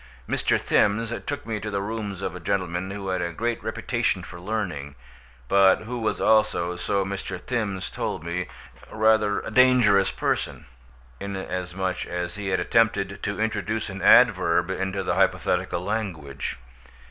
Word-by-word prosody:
Mr. - - +1
Thims 105 +2 +2 0.2
took 145 0 -3
me 110 -2 -3
to 105 - -5
the 100 -1 -1
rooms 100 -2 -4
of 90 - -3
a - - -6
gentleman 90 0 -2
who 95 -1 -5
had 95 -1 0
a 85 0 -2
great 115 +6 -2
reputation - - -1
for 85 -1 -10
learning, 90 -9 -3 0.5
but 100 +1 +5
who 120 +2 -5
was 110 - -1
also, 105 -5 +2
so 95 +2 0
Mr. 95 -1 -4
Thims 100 -4 -3
told - - -3
me, 85 +2 -3 0.4
rather 110 -1 +2
a - - -7
dangerous 120 -5 +5
person, - - -2 0.5
inasmuch 95 -1 -3
as 90 0 -3
he 105 -1 -5
had 95 - +1
attempted 105 -4 +1
to 100 - -3
introduce 110 -1 -1
an 100 0 -7
adverb 95 -7 +5
into 95 +1 -2
the - - 0
hypothetical 85 - +1
language. 85 - -3
100 Hz, 150 wpm, -25 LUFS, 90-110 Hz, 0.5 s, but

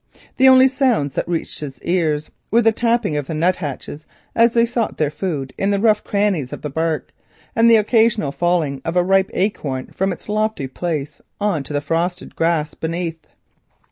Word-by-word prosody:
The 265 +1 +7
only 260 0 +7
sounds 255 - +1
that - - -2
reached 170 -2 -3
his 140 -3 -7
ears 160 -4 0 0.2
were 235 +2 +3
the 225 - +5
tappings 230 -8 0
of 140 - -6
the 160 - -4
nut 175 +4 +2
hatches 150 -1 -6 0.3
as 230 0 +4
they 230 0 +5
sought 235 -2 -2
their 150 -2 0
food 150 -7 -4
in 195 - +1
the 200 -1 +1
rough 215 0 +3
crannies 200 -10 0
of - - -8
the 150 - -4
bark, 160 -1 -2 0.4
and 230 +1 +5
the 230 - +7
occasional 220 - +2
falling 160 -4 0
of 165 - -3
a 180 - +4
rich 190 +1 +3
ripe - - -20
acorn 145 -10 -2
from 190 +1 0
its 175 - -8
lofty 215 -7 -1
place 150 0 -4 0.2
on 200 -7 0
to 150 - -7
the 145 - 0
frosted 170 +4 -2
grass 165 -2 0
beneath. 165 -1 -4
175 Hz, 195 wpm, -20 LUFS, 150-215 Hz, 0.4 s, The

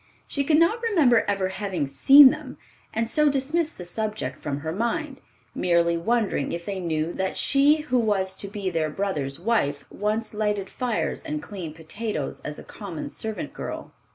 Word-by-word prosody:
She 280 - -1
could 300 +2 +3
not 340 +9 +3
remember 315 - +4
ever 195 -2 0
having 190 -5 -2
seen 270 - +8
them, 305 +1 -7 0.3
and 225 +1 -1
so 300 +5 +3
dismissed 300 +4 -1
the 180 - -7
subject 210 -8 -4
from 145 -1 -4
her 160 +1 -3
mind, 265 - -2 0.3
merely 170 -1 +2
wondering 210 - 0
if 170 0 -4
they 195 -2 -3
knew 165 -1 -1
that 190 0 -2
she 290 +2 +4
who 255 -5 +1
was 200 -4 0
to 200 - -5
be 200 -2 -3
their 160 -2 0
brother's 150 -6 -3
wife 170 -9 0
once 215 +2 -2
lighted 210 -2 -1
fires 245 -4 -2
and 305 -2 -4
cleaned 180 - -7
potatoes 165 -1 -4
as 150 - -7
a - - -9
common 190 -7 -7
servant 220 -1 -5
girl. - - -6
210 Hz, 175 wpm, -25 LUFS, 170-265 Hz, 0.3 s, seen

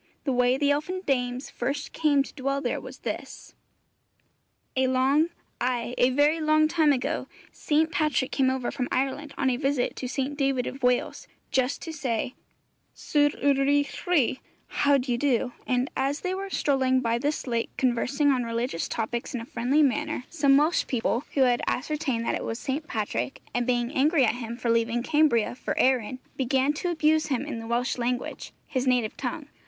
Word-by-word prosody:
The 270 - 0
way 250 +1 +3
the 285 0 +2
elfin 310 +6 -1
dames 250 -1 -1
first 280 +5 -3
came 290 -3 +3
to - - -12
dwell 275 0 -1
there - - -2
was - - -11
this: - - -6 1.2
A 260 0 +2
long, 270 +5 +3 0.3
ay, 245 -1 -1
a 250 - +4
very 290 +5 +3
long 310 0 +4
time 315 -2 +3
ago, 260 -3 -1 0.2
St. 315 +2 +1
Patrick 305 -6 0
came 265 -2 +2
over 260 -2 -1
from 250 -3 -2
Ireland 275 +2 -2
on 265 -1 +2
a 245 - 0
visit 270 -2 0
to 255 - -4
St. 270 +2 -2
David 270 -3 0
of 270 - -6
Wales, 250 0 0 0.2
just 260 -1 0
to 325 - -6
say 250 -5 -2 0.6
'Sut 290 -1 +2
yr 285 0 +5
y'ch 285 0 +2
chwi?' 295 -8 +2 0.3
(How 285 0 +3
d'ye 250 -2 -1
do?); 250 -2 +1
and 250 0 +1
as 275 +2 -1
they 365 0 -2
were 390 +1 -4
strolling 260 -6 +2
by 230 -1 0
this 290 +4 -1
lake 235 -2 -1
conversing 270 +3 +2
on 255 -2 +1
religious 230 -5 -2
topics 235 +2 -3
in - - -2
a - - -7
friendly 260 +5 +2
manner, 290 +1 0
some 280 -4 +4
Welsh 310 +4 +2
people 245 +2 0
who 275 - +3
had 245 -2 +4
ascertained 275 -4 -1
that - - 0
it - - -2
was 225 - -3
St. 285 +5 -3
Patrick, 135 - -3
and 245 0 0
being 240 0 +1
angry 285 0 +3
at 220 - +2
him 235 -1 -6
for 240 -2 0
leaving 230 +1 +1
Cambria 295 -8 +2
for 245 - -4
Erin, 255 -2 +2 0.2
began 265 +2 +2
to 355 +4 -3
abuse 315 -1 +2
him 270 -2 -1
in 290 -6 -5
the 225 - -7
Welsh 245 +2 -1
language, 245 +1 -3
his 260 -1 -2
native 245 -4 +1
tongue. 280 +3 -4
265 Hz, 185 wpm, -26 LUFS, 245-290 Hz, 1.2 s, yr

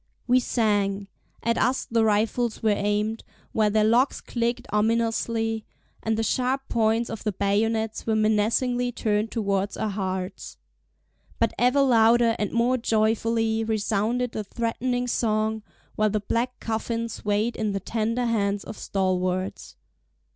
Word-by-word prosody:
We 250 +1 +4
sang! 205 -5 0 0.3
At 230 +1 +1
us 255 +2 +1
the 230 -1 +1
rifles 220 +2 +1
were 220 - +4
aimed, 210 +2 -1 0.3
while 215 -1 +2
their 215 +1 +2
locks 235 +5 +3
clicked 235 0 -2
ominously, 225 0 0 0.4
and 220 0 0
the 225 - 0
sharp 260 +3 0
points 225 +1 +2
of 225 - -6
the 215 - 0
bayonets 220 +3 0
were 220 - +2
menacingly 225 +4 +1
turned 215 0 0
towards 200 -3 -1
our 215 - -1
hearts. 190 -1 -4 0.8
But - - +1
ever 250 +4 +4
louder 230 -2 +4
and 210 - -1
more 240 +2 +2
joyfully 225 0 +1
resounded 220 +2 0
the 215 - -4
threatening 240 +3 -2
song, 220 -2 0 0.3
while 215 0 +2
the 215 +1 0
black 240 +4 -2
coffin 230 +1 -2
swayed 210 +1 -1
in 215 -2 -1
the 200 - -2
tender 230 +4 -1
hands 205 -3 0
of 215 - -9
stalwarts. 185 -1 -2
220 Hz, 140 wpm, -25 LUFS, 210-235 Hz, 0.8 s, We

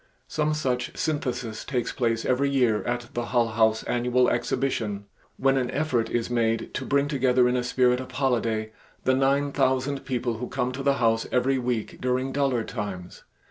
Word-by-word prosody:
Some 155 0 0
such 125 -5 -2
synthesis 125 -7 -2
takes 125 -4 -2
place 115 -2 -1
every 135 +2 +2
year 125 -6 +2
at 120 -1 -3
the 120 0 -2
Hull 120 -1 +1
House 110 0 +2
annual 125 +1 +2
exhibition, 105 -7 -1 0.3
when 135 0 +3
an 125 -2 0
effort 135 -6 0
is 120 -1 -1
made 115 -2 0
to 135 - -3
bring 140 0 +2
together 130 -3 +3
in 125 - +1
a 125 - 0
spirit 125 0 +2
of 130 - -7
holiday 115 -5 0 0.3
the 130 - +3
nine 140 +2 +2
thousand 135 0 0
people 120 -3 -2
who 125 - -4
come 125 - -1
to 130 +2 -5
the 140 0 +2
House 115 -3 +1
every 130 +1 +2
week 120 -3 -3
during 130 +1 0
duller 135 -4 +1
times. 100 -6 -6
125 Hz, 180 wpm, -26 LUFS, 115-135 Hz, 0.3 s, when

